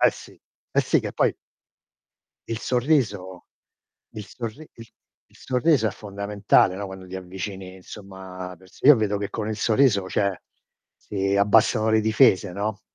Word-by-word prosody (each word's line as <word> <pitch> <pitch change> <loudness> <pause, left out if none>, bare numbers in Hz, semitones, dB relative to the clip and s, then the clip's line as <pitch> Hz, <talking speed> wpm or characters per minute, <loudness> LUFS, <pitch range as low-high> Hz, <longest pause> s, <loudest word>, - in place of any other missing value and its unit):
Eh, - - +6
sì. - - -14 0.3
Eh, - - +3
sì - - +1
che - - -5
poi - - +1 1.1
il 115 - -4
sorriso 115 - -1 0.7
il 105 -2 -7
sorri 120 +8 -8
il 115 -1 -13 0.4
il - - -21
sorriso 130 -2 +1
è - - -2
fondamentale, 100 -2 +1
no, 100 +1 -5
quando 95 -1 -10
ti 95 - -8
avvicini, 95 0 -7
insomma, 95 -1 -10
a 90 - -12
perso 95 +7 -12
Io 150 -2 +9
vedo 105 -2 0
che 100 0 -4
con 110 -1 -4
il 110 - -2
sorriso, 110 -3 +2
cioè, 100 -3 0 0.6
si 100 -1 -2
abbassano 110 +2 +3
le 110 0 +3
difese, 105 -3 +3
no, 105 +3 -4
100 Hz, 160 wpm, -24 LUFS, 95-110 Hz, 1.1 s, Io